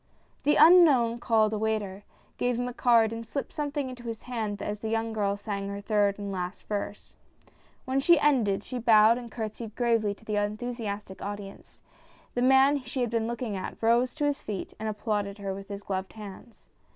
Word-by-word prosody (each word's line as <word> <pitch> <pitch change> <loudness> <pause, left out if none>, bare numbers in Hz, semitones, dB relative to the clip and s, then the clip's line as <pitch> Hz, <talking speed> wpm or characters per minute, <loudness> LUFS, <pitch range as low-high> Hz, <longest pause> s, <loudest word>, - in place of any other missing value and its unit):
The 295 - +4
unknown 285 -10 +6
called 220 -2 +2
a 215 - -1
waiter, 210 -2 -2 0.3
gave 245 -1 +1
him 245 0 -1
a 250 - -5
card 230 -2 +3
and 230 0 -5
slipped 275 +4 -5
something 290 -2 -2
into 255 -1 -8
his 230 -1 -6
hand 220 -5 -3
as 210 +1 -4
the 220 - -4
young 225 0 -1
girl 200 -2 0
sang 200 -1 -4
her 200 0 -5
third 205 -1 +1
and 200 -1 -5
last 180 0 -5
verse. 205 0 -5 0.7
When 260 +1 0
she 335 +3 +5
ended 235 -10 +2
she 250 +3 -5
bowed 225 0 +5
and 240 -2 -10
courtsied 220 -1 -6
gravely 230 -4 +1
to 220 - -21
the 210 -1 -1
enthusiastic 210 -2 -4
audience: 200 -1 -8 0.5
the 245 - -1
man 265 +2 +5
she 255 +1 -4
had 240 -2 0
been 225 -1 0
looking 235 -2 -3
at, 185 - -5
rose 235 +2 +2
to 300 -1 -1
his 290 -1 0
feet 205 -3 -5
and 220 - -2
applauded 205 -1 -2
her 200 -2 -4
with 195 0 -8
his 200 0 -7
gloved 190 -1 -4
hands. 215 +2 -11
220 Hz, 195 wpm, -28 LUFS, 205-245 Hz, 0.7 s, unknown